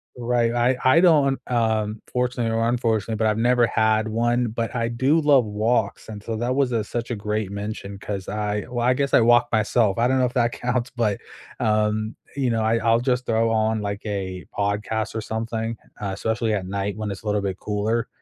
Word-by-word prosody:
Right, 120 -1 +1
I 120 +2 +2
I 130 +6 +6
don't, 150 -6 +4
um, 110 -3 0
fortunately 125 -2 -1
or 115 +1 +1
unfortunately, 115 -3 0
but 110 0 +1
I've 105 0 +1
never 120 0 +3
had 110 0 +2
one, 120 +2 +1
but 115 +2 -3
I 115 -1 0
do 130 +7 +2
love 140 -5 +4
walks, 110 +1 -1
and 105 -1 -8
so 115 - -3
that 120 +3 -1
was, 135 -3 +1
uh, 115 - +1
such 120 +3 -4
a 120 - -1
great 105 -1 -3
mention 100 -1 -5
'cause 100 -2 -5
I 105 0 -2
well, 120 -1 -2
I 125 - +4
guess 140 0 -1
I - - +6
walk 120 +1 +5
myself, 110 -1 +2
I 120 - +3
don't 130 +1 +2
know 130 - +3
if 125 - -3
that 120 -1 +1
counts, 125 0 -2
but, 115 -5 -1 0.4
um, 110 0 0 0.2
you 135 -3 0
know, 115 -1 0
I 115 +1 +2
I'll 115 +1 +3
just 125 0 -1
throw 115 0 +2
on, 110 0 +1
like, 100 0 -4
a 95 -3 -4
podcast 105 +1 -1
or 110 - -2
something, 115 +1 -3 0.2
uh, 100 - -2
especially 110 +2 -1
at 95 -2 -3
night 100 +1 -3
when 110 -1 -3
it's 100 - -7
a - - -21
little 105 -1 +1
bit 95 -1 -3
cooler. 110 +2 -1
115 Hz, 215 wpm, -23 LUFS, 105-120 Hz, 0.4 s, I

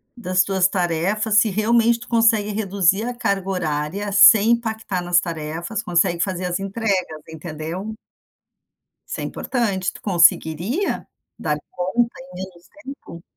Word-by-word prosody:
das 185 -6 +1
tuas 190 -1 +2
tarefas, 195 +4 0
se 220 - +2
realmente 230 +3 +2
tu 240 - -12
consegue 225 -2 +3
reduzir 200 -1 +1
a 245 +1 -3
carga 200 -5 -2
horária 180 +3 -2
sem 205 +2 +7
impactar 220 -5 -1
nas 175 0 +3
tarefas, 170 +5 -5
consegue 175 -1 +1
fazer 185 -2 -2
as 180 +1 -2
entregas, 195 -6 -2
entendeu? 160 +6 -6 1.1
Isso - - -5
é - - -3
importante. 200 -7 -2
Tu - - -13
conseguiria 180 - +1 0.3
dar 150 -1 -1
conta 235 +7 -1
em 270 -4 -13
menos 180 -1 -9
tempo? 265 - -10
195 Hz, 135 wpm, -21 LUFS, 175-220 Hz, 1.1 s, sem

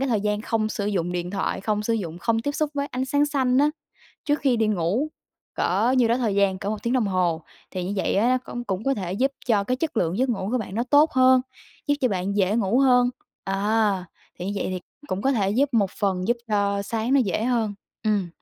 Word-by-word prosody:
cái 270 - 0
thời 220 -5 +1
gian 210 0 -1
không 215 0 -1
sử 205 -2 -3
dụng 180 -4 -1
điện 175 0 -3
thoại, 195 0 -2
không 210 +1 -1
sử 230 - 0
dụng, 175 -6 -4
không 225 +6 0
tiếp 285 +5 -2
xúc 300 0 -1
với 280 0 -1
ánh 255 -1 -3
sáng 285 +2 +2
xanh 260 -3 +1
á, 295 +2 +4 0.5
trước 295 -1 +1
khi 260 -4 +2
đi 225 - +2
ngủ 205 - 0 0.5
cỡ 215 +8 +1
nhiêu 240 -2 +4
đó 235 - +3
thời 230 -5 0
gian, 195 -1 +2
cỡ 200 - -4
1 215 - -4
tiếng 235 - -1
đồng 245 -5 +2
hồ. 175 -4 0 0.3
Thì 180 -1 -4
như 190 - -3
vậy - - 0
á, 225 +5 +3
nó 255 0 +3
công 240 0 -5
cũng 195 -1 -3
có 275 - +2
thể 185 -5 -4
giúp 265 +8 +1
cho 210 -5 +2
cái 255 +5 0
chất 310 -1 -3
lượng 175 -1 0
giấc 260 +1 +2
ngủ 195 -5 -2
của 255 - +2
bạn 200 -4 -6
nó 235 - 0
tốt 295 +2 +5
hơn, 260 0 +5 0.5
giúp 290 - +3
cho 255 - +3
bạn 195 -1 -2
dễ 205 +2 +2
ngủ 225 +2 +2
hơn. 250 -2 +4 0.3
À, 200 0 +1 0.3
thì 180 - -5
như 200 - -2
vậy - - -1
thì 185 - -3 0.3
cũng 185 +2 -2
có 270 - +2
thể 200 -6 +1
giúp 265 +7 +2
một 200 -4 +3
phần 190 -1 -1
giúp 240 - +3
cho 200 -1 +1
sáng 225 +4 -2
nó 275 - +5
dễ 215 0 0
hơn. 230 -4 0 0.3
Ừm. 205 -4 +1
215 Hz, 255 wpm, -24 LUFS, 195-255 Hz, 0.5 s, tốt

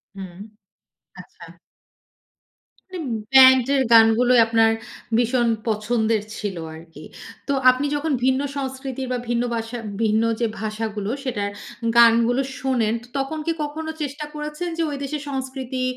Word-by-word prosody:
হুম, 190 -3 -9 0.8
আচ্ছা। - - -14 1.5
মানে - - -4 0.4
ব্যান্ডের 260 +1 +7
গানগুলোই 230 +2 +6
আপনার 225 0 +3 0.5
ভীষণ 240 0 +2 0.2
পছন্দের 220 0 0 0.2
ছিল 205 -3 -4 0.2
আরকি। 165 0 -13 0.4
তো 280 - +1 0.2
আপনি 255 +3 +1
যখন 300 +2 -2
ভিন্ন 260 +1 +2 0.2
সংস্কৃতির 265 -1 -5
বা - - 0
ভিন্ন 240 0 +1
ভাষা 230 +1 -4 0.3
ভিন্ন 220 0 +2 0.2
যে, 235 - +1 0.2
ভাষাগুলো 215 -1 -3
সেটার 215 -7 -2 0.5
গানগুলো 235 +2 +5 0.2
শোনেন, 245 -5 0 0.2
তখন 275 +3 -3
কি 335 - +1
কখনো 315 +2 -5
চেষ্টা 290 +1 -4
করেছেন 300 +3 -4
যে, - - 0
ঐ - - -5
দেশের 290 +1 -4
সংস্কৃতি 265 -1 -4
250 Hz, 125 wpm, -22 LUFS, 225-270 Hz, 1.5 s, ব্যান্ডের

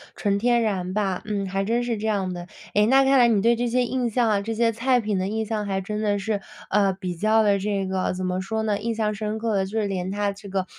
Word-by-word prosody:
纯 200 -1 0
天 240 +1 +3
然 185 -4 -1
吧， 195 -3 -1
嗯， 205 -2 -2
还 195 +1 -1
真 235 +2 +1
是 235 -2 -1
这 220 +1 -3
样 195 -3 0
的。 175 0 -7 0.3
哎， 210 0 +4
那 270 +4 +5
看 270 0 +4
来 240 - +6
你 215 -4 +3
对 235 +2 +3
这 245 0 0
些 250 +1 +2
印 245 0 -1
象 235 0 +1
啊， 205 -2 +2
这 225 +3 -3
些 230 +1 +2
菜 250 +2 +1
品 210 -3 -1
的 185 - -1
印 220 +1 -2
象 210 -1 -2
还 195 -1 -1
真 210 +2 -4
的 205 -1 +1
是， 205 +1 -2 0.3
呃， 200 -1 +3
比 185 -1 -5
较 220 +3 +3
地 200 -1 +3
这 200 -1 -1
个， 190 -1 -1
怎 185 0 -4
么 185 0 -1
说 220 +3 -2
呢？ 210 -2 0
印 230 -1 -2
象 215 -1 0
深 215 +1 -3
刻 225 -1 -1
的， 190 -1 +1
就 190 - -9
是 - - 0
连 185 -2 -2
它 205 0 -1
这 200 +1 -11
个 190 -1 -1
210 Hz, 300 characters per minute, -24 LUFS, 195-225 Hz, 0.3 s, 来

